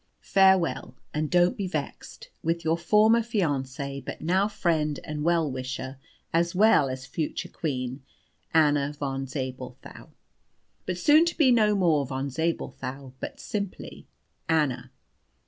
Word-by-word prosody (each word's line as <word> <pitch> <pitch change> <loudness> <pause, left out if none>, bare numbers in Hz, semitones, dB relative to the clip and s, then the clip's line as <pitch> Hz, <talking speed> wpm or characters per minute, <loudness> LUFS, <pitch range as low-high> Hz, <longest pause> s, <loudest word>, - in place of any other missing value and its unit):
Farewell, 190 -9 +3 0.2
and 150 0 -1
don't 175 0 +3
be 195 - -3
vexed 155 -6 -6
with 165 0 -1
"Your 160 +1 +3
former 215 +6 +4
fiancée, 140 - -2
but - - -7
now 185 +5 +2
friend 160 -8 0
and 150 -1 -4
well 165 -1 +2
wisher, 130 +1 -5 0.3
as 170 +1 +1
well 195 -9 +5
as 130 0 -5
future 155 +3 -4
Queen, 130 -3 -4 0.5
"ANNA 145 -2 +3
VON 135 -1 -3
ZABELTHAU. 130 -2 -7 0.8
"(but 180 -1 -2
soon 295 - +6
to 340 - -2
be 285 -6 +5
no 215 -3 +4
more 160 -8 +2
Von 135 +1 -3
Zabelthau, 135 -3 -3
but - - -6
simply 200 -3 -6 0.4
ANNA.) 135 -6 +1
155 Hz, 130 wpm, -26 LUFS, 135-180 Hz, 0.8 s, soon